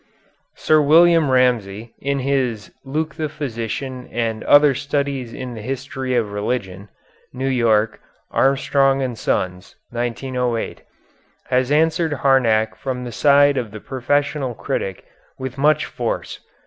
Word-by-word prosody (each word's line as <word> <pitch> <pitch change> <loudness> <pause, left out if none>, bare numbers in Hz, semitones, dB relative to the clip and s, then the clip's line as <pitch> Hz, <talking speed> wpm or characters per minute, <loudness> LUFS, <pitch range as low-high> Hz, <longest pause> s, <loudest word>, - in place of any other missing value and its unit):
Sir 155 -1 +3
William 165 +1 +5
Ramsay, 115 -4 +1
in 140 +1 -1
his 125 -6 -1
"Luke 155 +3 -3
the 155 -2 -3
Physician 130 -2 -5
and 115 -1 -2
Other 145 -1 +6
Studies 140 -3 -2
in 125 0 -6
the 110 - -8
History 130 +1 -4
of 110 -4 0
Religion" 100 -2 -3 0.4
(New 130 +1 -3
York: 115 -4 +2 0.3
Armstrong 135 0 +2
and 125 -2 -3
Sons, 90 -3 -2 0.2
1908), 120 0 -2 0.7
has 125 +1 +2
answered 160 +1 +2
Harnack 115 -6 +2
from 130 -2 -4
the 120 - -6
side 145 +1 +4
of 120 -4 -2
the 110 +1 -9
professional 135 +1 -1
critic 95 -3 -4 0.3
with 130 0 -6
much 150 +1 +3
force. 120 -3 -4
130 Hz, 125 wpm, -20 LUFS, 115-140 Hz, 0.7 s, Other